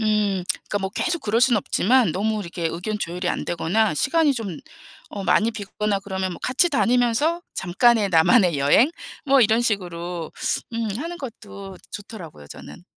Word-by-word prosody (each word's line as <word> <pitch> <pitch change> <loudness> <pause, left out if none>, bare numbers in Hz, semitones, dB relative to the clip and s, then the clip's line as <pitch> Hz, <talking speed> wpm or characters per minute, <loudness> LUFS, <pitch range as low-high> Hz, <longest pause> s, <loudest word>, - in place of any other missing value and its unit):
음. 210 -4 0 0.2
그러니까 205 - -1
뭐 190 -1 -4
계속 340 - -1
그럴 220 +2 0
수는 245 -2 +5
없지만 225 -1 +2
너무 215 +3 -1
이렇게 170 -2 -4
의견 180 +6 -4
조율이 180 0 -3
안 - - -2
되거나 190 +4 0
시간이 320 - +2
좀 200 -9 -5 0.5
어 200 - -6
많이 205 +5 +2
비거나 210 -1 -3
그러면 190 -2 -4
뭐 - - -10
같이 260 +8 +3
다니면서 250 +4 +1
잠깐의 210 +4 +2
나만의 175 - +4
여행? 145 - +4 0.3
뭐 275 -2 +4
이런 220 +1 +3
식으로 175 -6 -2 0.4
음 230 -1 -2
하는 335 +5 -5
것도 200 - -10
좋더라고요, 180 - -10
저는. - - -11
210 Hz, 345 characters per minute, -22 LUFS, 180-235 Hz, 0.5 s, 수는